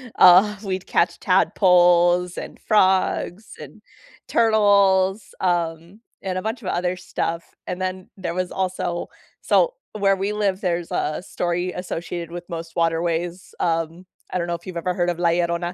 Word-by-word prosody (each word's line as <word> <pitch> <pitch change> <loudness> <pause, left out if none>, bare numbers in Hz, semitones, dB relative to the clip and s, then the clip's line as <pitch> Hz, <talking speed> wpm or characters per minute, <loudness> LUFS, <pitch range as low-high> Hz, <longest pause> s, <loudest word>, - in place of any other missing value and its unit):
uh, 195 +4 +7
we'd 190 -2 -3
catch 170 - +1
tadpoles 180 -2 +4
and - - -7
frogs 190 0 +1
and - - -11 0.5
turtles, 200 -3 +3
um, 175 +2 -2 0.2
and 185 -1 -3
a - - -2
bunch 225 +4 -4
of 190 - -8
other 180 +1 -1
stuff. 170 -2 -4
And 180 +1 -4
then 185 0 -4
there 180 -3 -4
was 185 0 -2
also 185 -2 -2 0.3
so - - +3 0.2
where 195 -2 +2
we 195 +2 -2
live, 200 -1 -1
there's 175 -2 -2
a 155 +3 -2
story 175 +1 -2
associated 175 -2 -5
with 175 0 -7
most 165 -1 -7
waterways, 170 +2 -1
um, 165 +1 -1 0.2
I - - -2
don't 170 -1 -2
know 175 - -2
if 170 - -12
you've 185 - -7
ever 180 +2 -1
heard 175 0 0
of 175 -1 -3
La 175 -1 +3
Llorona. 170 +1 0
180 Hz, 160 wpm, -22 LUFS, 170-190 Hz, 0.5 s, uh